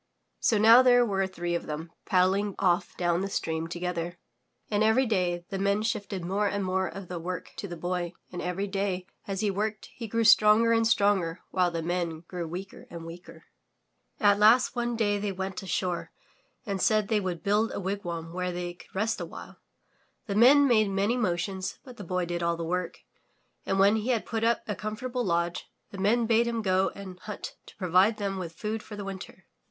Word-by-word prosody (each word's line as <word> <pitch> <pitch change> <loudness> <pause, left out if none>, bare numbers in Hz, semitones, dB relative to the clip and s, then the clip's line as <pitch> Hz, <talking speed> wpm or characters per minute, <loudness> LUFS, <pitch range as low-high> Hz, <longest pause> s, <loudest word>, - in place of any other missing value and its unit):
'' - - -50
So 220 - +3
now 225 +4 +8
there 245 -1 +5
were 195 -3 0
three 175 -2 -4
of 170 - -2
them 160 +2 -5 0.2
paddling 190 +1 +2
off 180 -2 +1
down 175 0 +1
the 195 - -2
stream 160 -3 -2
together, 175 0 -4 0.5
and 210 0 +1
every 220 +5 +4
day 180 -6 0
the 195 - -3
Men 200 +2 +1
shifted 200 -5 -3
more 200 +3 0
and 200 -1 -1
more 190 0 0
of 190 +1 -8
the 180 -1 -5
work 180 +2 -5
to 200 - -5
the 175 -2 -7
Boy 175 +1 -2 0.2
and 180 - -5
every 180 +3 -2
day 195 -2 -2 0.2
as 195 -1 -2
he 210 -2 +1
worked 210 +2 -3
he 230 - -6
grew 230 +2 0
stronger 215 +1 +6
and 225 0 +3
stronger 195 -6 +2
while 180 -1 +2
the 165 -1 -3
Men 170 -2 -2
grew 175 0 -6
weaker 185 +4 -8
and 170 -1 -8
weaker. 170 +1 -11 0.7
At 205 -1 +4
last 230 +6 +5
one 240 0 -1
day 205 -3 +1
they 205 0 -2
went 190 0 -4
ashore 185 -2 -2 0.5
and 200 -4 -2
said 215 -2 +3
they 220 -2 +2
would 180 -4 -4
build 210 +3 +2
a - - -4
wigwam 175 -4 -4
where 180 0 -2
they 175 0 -4
could 175 - -18
rest 220 +3 0
awhile. - - -9 0.7
The 205 - -3
Men 270 +7 +7
made 215 -5 +4
many 200 +4 +1
motions, 190 -3 -2
but 250 -3 -12
the 205 - -7
Boy 180 0 -1
did 175 0 -3
all 170 0 0
the 165 - -4
work, 180 +1 -3 0.7
and 195 - +1
when 200 +3 +5
he 220 +3 -3
had 235 -4 +1
put 225 -1 -2
up 235 0 +2
a 210 - -1
comfortable 240 +5 -4
lodge, 170 -2 -1 0.2
the 195 - -8
Men 225 +5 +2
bade 230 +1 +3
him 230 -1 -2
go 190 0 +2
and 190 -2 -9
hunt 210 +2 -7
to - - -14
provide 185 +3 +3
them 195 -2 -2
with 170 -3 -5
food 215 +5 -3
for 210 - -9
the 205 -1 -6
winter. 195 -1 -8
195 Hz, 205 wpm, -28 LUFS, 180-215 Hz, 0.7 s, now